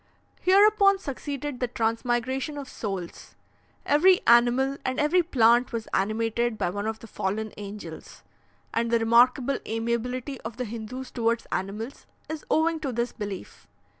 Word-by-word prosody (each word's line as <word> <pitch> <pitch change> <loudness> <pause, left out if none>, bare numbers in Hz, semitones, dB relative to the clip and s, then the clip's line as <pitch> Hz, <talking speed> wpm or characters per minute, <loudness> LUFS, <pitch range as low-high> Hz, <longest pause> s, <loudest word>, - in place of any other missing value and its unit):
Hereupon 400 +1 +5
succeeded 285 -4 -5
the 250 - 0
transmigration 240 +5 -1
of 280 -2 -6
souls; 195 -8 -6 0.5
every 360 +6 +4
animal 245 +3 +4
and 260 +1 -2
every 305 +5 +4
plant 240 -6 +3
was 230 -2 -4
animated 225 +3 0
by 175 - -1
one 205 +2 -3
of 220 0 -2
the 230 - -12
fallen 215 +1 -3
angels, 200 -5 -9 0.5
and 230 0 0
the 235 - +3
remarkable 245 +4 +3
amiability 235 +4 -2
of 225 +1 -7
the 250 - -2
Hindoos 235 +4 -7
towards 230 -1 0
animals 210 +7 -4 0.2
is 315 -1 -5
owing 320 +1 +2
to 285 -4 -3
this 235 +1 -1
belief. 205 -4 -7
240 Hz, 140 wpm, -26 LUFS, 225-275 Hz, 0.5 s, Hereupon